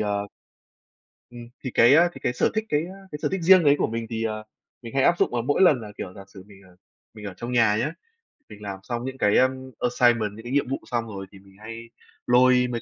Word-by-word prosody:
à 105 -1 -1 1.1
ừm, 120 -1 -11
thì 130 - -4
cái, 120 +4 +6
a, 170 +2 +5
thì - - -11
cái 125 - 0
sở - - +1
thích, 220 0 -1
cái, 150 +3 0
á, 190 -4 -10
sở - - 0
thích 190 -2 -2
riêng 185 +1 +6
đấy 145 -1 +5
của - - 0
mình 115 0 -4
thì, 115 -1 -3
ờ, 110 -1 -3 0.4
mình 115 0 -10
hay 135 - +3
áp 175 - +3
dụng - - +2
vào 120 -1 -1
mỗi 145 +9 0
lần 145 -10 +5
là, 105 -1 -9
kiểu, 90 - -7
giả 100 - -11
sử 95 -1 -14
mình, 100 -1 -17
ờ, 90 -1 -20 0.4
mình 105 -1 -11
ở 100 - -6
trong 120 +1 -6
nhà 115 -4 +3
nhé, 150 - -1 0.6
mình 105 - -13
làm 100 -2 -6
xong 120 +3 -4
những 130 0 -6
cái, 105 -3 +2
ờ, 130 - +5 0.3
assignment, 120 -4 +2
những 110 - -11
cái 120 - -7
nhiệm 140 -2 +1
vụ 135 - -1
xong 120 -1 -2
rồi 100 -3 -7
thì 100 - -15
mình 95 0 -21
hay 115 +1 -9 0.4
lôi 125 0 +4
mấy 120 - -3
120 Hz, 260 wpm, -24 LUFS, 105-135 Hz, 1.1 s, cái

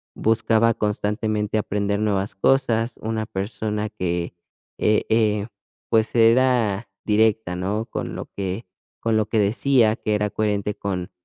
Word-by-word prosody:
buscaba 115 +1 +2
constantemente 105 0 -1
aprender 100 -1 -1
nuevas 100 -2 -1
cosas, 115 +1 +1
una 110 0 -2
persona 105 +1 -3
que 90 -4 -3 0.4
eh 105 0 +2
eh 105 -2 +2 0.4
pues, 110 -1 +2
era 115 -3 +3 0.2
directa, 110 -3 +2
¿no?, 100 +5 -2
con - - -5
lo - - -5
que 95 +3 -3 0.4
con 115 -1 +1
lo 110 -1 +1
que 110 - -1
decía, 110 +2 +3
que 105 - -1
era 105 0 0
coherente 105 -1 -1
con 95 -2 -4
105 Hz, 135 wpm, -23 LUFS, 100-115 Hz, 0.4 s, era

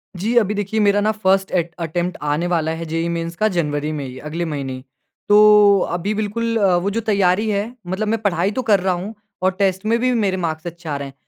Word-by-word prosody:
जी, 210 +7 -2
अभी 210 -3 +3
देखिए 205 +1 -2
मेरा 205 -1 +3
ना 215 +1 +2
फ़र्स्ट 195 -2 +1
एट 170 -2 -1
अटेम्प्ट 175 +2 -2
आने 150 +4 -1
वाला 165 -3 0
है 165 +1 -5
जेईई 165 +1 -2
मेन्स 170 0 -3
का 215 +5 +1
जनवरी 150 -6 -1
में 145 -3 -4
ही, 130 0 -8
अगले 160 +3 -4
महीने 140 -4 -4
ही। 130 0 -9 0.5
तो 210 -1 +7
अभी 180 +5 -2
बिल्कुल 220 +2 -2
अ, 195 -4 +3
वो 180 +3 -1
जो 215 +3 -2
तैयारी 205 -1 +1
है 210 +3 -2
मतलब 190 +4 -2
मैं 225 +1 0
पढ़ाई 190 -2 +1
तो 255 - -2
कर 200 -2 +5
रहा 185 0 0
हूँ 185 +5 -5 0.3
और 185 - +3
टेस्ट 190 0 0
में 225 +2 +2
भी 255 +1 +1
मेरे 200 -5 0
मार्क्स 160 -2 -3
अच्छे 170 0 -9
आ 145 - -1
रहे 140 0 -5
हैं। 135 - -12
185 Hz, 240 wpm, -20 LUFS, 165-210 Hz, 0.5 s, तो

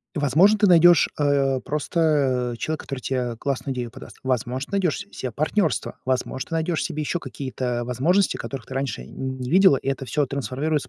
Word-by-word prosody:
Возможно, 160 +9 +4
ты 210 - +3
найдёшь, 175 -1 +6
э, 140 -2 +2
просто, 145 -5 +1
э, - - -13
человека, 155 +4 -3
который 135 -2 -5
те, 130 - -3
э, 125 -2 -2
классную 135 0 -3
идею 120 -2 -4
подаст. - - -12
Возможно, 130 - -2
найдёшь 190 -6 +1
с 200 - -9
cе 130 - -4
партнёрство. 155 - -1
Возможно, 130 +2 -2
ты 165 - -2
найдёшь 160 0 0
себе 155 - -3
ещё 175 +3 -2
какие-то 125 -5 -4
возможности, 165 +11 +2
которых 135 -3 -6
ты 130 - -9
раньше 135 - -3
не 130 - -5
видела, 190 -5 +6
и 135 - -9
это 135 -1 -1
всё 150 +2 0
трансформируется 140 +2 -2
135 Hz, 185 wpm, -23 LUFS, 130-160 Hz, -, найдёшь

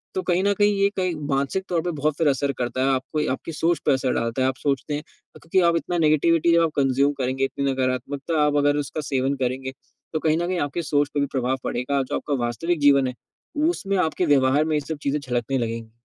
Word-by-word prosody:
तो 185 - 0
कहीं 180 +1 +1
न 200 - +3
कहीं 205 +1 +3
ये 200 - +4
कहे 185 -1 +1 0.2
मानसिक 140 +7 0
तौर 170 -2 +1
पे 175 - -2
बहुत 150 -1 -1
फ़िर 165 - +2
असर 140 +1 0
करता 125 +1 -2
है। 135 - +2
आपको 135 +2 -2
आपकी 135 - -4
सोच 165 0 +1
पे 145 - +4
असर 130 -1 0
डालता 115 +3 -1
है - - +3
आप 130 - -3
सोचते 140 +2 -2
हैं 150 - -5
क - - -21
क्योंकि 175 +3 +1
आप 170 - +3
इतना 175 +1 -2
नेगेटिविटी 165 +2 +3
जब 170 - +5
आप 165 - +1
कंज़्यूम 140 +1 +2
करेंगे, 130 +1 -1
इतनी 140 0 -1
नकारात्मकता 135 +4 -1
आप 145 0 +1
अगर 145 0 +3
उसका 145 +2 -3
सेवन 135 -1 -1
करेंगे, 130 +1 -2 0.4
तो 155 - 0
कहीं 155 0 +1
न 175 - -1
कहीं 180 -1 -1
आपके 145 +4 -2
सोच 145 -1 +1
पे 145 - 0
भी 140 - +2
प्रभाव 130 0 0
पड़ेगा। 130 +3 -1
जो 130 - -4
आपका 145 - -3
वास्तविक 165 +8 -1
जीवन 140 -2 +5
है 125 - -4 0.6
उसमें 200 - -1
आपके 180 +3 -1
व्यवहार 140 0 +3
में 155 -1 0
ये 150 - +2
सब 160 +2 -5
चीज़ें 140 +1 0
झलकने 125 -1 -2
लगेंगी। 115 -2 -4
145 Hz, 240 wpm, -23 LUFS, 130-165 Hz, 0.6 s, जब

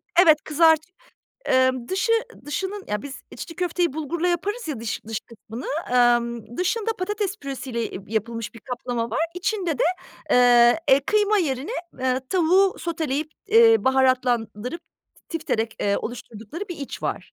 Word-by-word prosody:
T 355 - +8
evet, 310 -3 +5
kızartı 320 +2 +3 0.6
Imm, 260 -2 +2
dışı 385 +5 +1 0.3
dışının, 380 +7 -4
ya 210 0 -2
biz 280 -1 -8
içli 330 - -8
köfteyi 350 -3 0
bulgurla 315 +3 -2
yaparız 400 +5 -2
ya 270 -7 -4
dış 225 -1 -4
dış 220 0 -4
kısmını, 230 +1 -10 0.3
ımm, 240 -2 +2
dışında 440 +5 0
patates, 405 +1 -1
e, - - -52
püresiyle 250 -6 -4
yapılmış 225 0 -3
bir 230 - -11
kaplama 240 -1 -3
var. - - -1
İçinde 360 -4 -1
de, - - +2 0.5
ııı, 240 -1 +6
e, 270 +1 +6
kıyma 420 0 +3
yerine, 280 - -1 0.3
ııı, 255 0 +1
tavuğu 370 +2 +3
soteleyip, 310 -3 -2 0.2
eee, 455 +2 +7
baharatlandırıp, 255 0 +1 0.5
tifterek, 235 -9 -2
eee, 200 0 +1
oluşturdukları 240 - -7
bir 350 - -5
iç 280 - -7
var. - - -4
275 Hz, 145 wpm, -24 LUFS, 240-360 Hz, 0.6 s, T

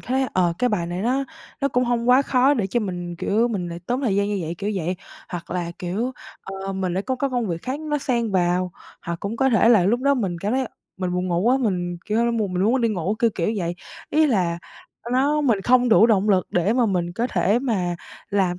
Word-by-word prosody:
thấy, 265 +1 0
ờ, 180 -2 +3
cái 250 - +2
bài 185 -6 -1
này 175 +2 -4
nó 260 +4 +1 0.4
nó 280 - +2
cũng 250 -1 +1
hông 240 0 0
quá 255 +2 +6
khó 270 +1 +3
để 220 -8 0
cho 240 +5 0
mình, 175 -4 -4
kiểu, 220 +7 +1
mình 185 -6 -3
lại 170 0 -6
tốn 250 +2 -1
thời 225 -8 0
gian 200 0 +1
như 205 - -1
vậy, 165 +1 -4
kiểu 205 +1 -2
vậy. 180 0 -2 0.3
Hoặc 175 -1 -7
là, 175 -1 -2
kiểu, 205 +9 -2 0.3
ờ, 195 0 -5
mình 190 -2 -2
lại 190 - -1
có 260 +4 -2
cái 275 +2 -1
công 245 -3 -1
việc 170 -2 -3
khác 265 +4 -3
nó 300 -1 -1
xen 235 -5 -1
vào. 180 0 +1 0.3
Hoặc 170 0 -4
cũng 205 +3 -4
có 265 +3 +2
thể 230 0 +4
là 210 -7 +6
lúc 235 +6 +2
đó 280 +1 +3
mình 195 -9 -2
cảm 200 +5 -2
thấy 260 0 +1 0.3
mình 185 -1 -2
buồn 180 0 -1
ngủ 170 - 0
quá, 245 +6 +3 0.5
kiểu, 230 +2 +1
mùng 215 -5 -1
mình 180 +1 0
luôn 220 - +3
muốn 260 - +2
đi 230 - +2
ngủ, 195 -1 -1
kiểu 230 -1 +3
kiểu 170 - -1
vậy. 175 -2 -2 0.4
Ý 310 +1 +4
là 180 - +1 0.4
ờ, 235 - -8
đó, 285 +4 +2
mình 235 -8 +2
không 250 0 +4
đủ 225 0 +6
động 210 -2 +2
lực 190 -3 +3
để 180 +4 +2
mà 245 -1 +2
mình 175 -4 -1
có 230 +6 -1
thể 225 -3 +2
mà 190 -9 -1 0.3
làm 190 -3 +1
210 Hz, 250 wpm, -23 LUFS, 180-250 Hz, 0.5 s, quá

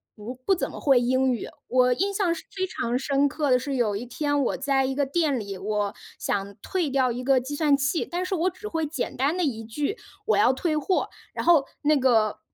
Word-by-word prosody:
不 220 +4 -7
不 385 - +4
怎 - - -3
么 - - -8
会 270 -4 +4
英 260 +1 +2
语， 235 - -4 0.2
我 250 0 +4
印 395 +7 0
象 380 -4 +1
是 325 - -8
非 375 0 0
常 245 -8 -2
深 280 +1 +2
刻 290 -1 -1
的 250 - +5
是， 275 +2 -3
有 220 -5 +1
一 235 +5 -4
天 290 +3 -1
我 - - -1
在 270 -1 +1
一 265 0 -2
个 285 -1 +1
店 290 -2 +1
里， 200 -2 -6
我 205 +1 -1 0.2
想 200 0 -2
退 355 -5 -1
掉 260 -2 +2
一 245 +2 -4
个 270 0 +4
计 260 +4 -6
算 295 -2 +3
器， 285 +4 0
但 355 +1 -3
是 375 - -3
我 360 +1 +2
只 375 +4 -9
会 325 -5 -1
简 290 -4 -4
单 280 +6 +1
的 360 - +1
一 225 -6 -2
句， 290 - -3 0.3
“我 440 - +2
要 250 - +5
退 310 +3 -1
货”， 360 +5 0 0.2
然 - - -4
后 320 -5 +5 0.2
那 300 0 +3
个 225 -5 +2
275 Hz, 255 characters per minute, -25 LUFS, 245-320 Hz, 0.3 s, 的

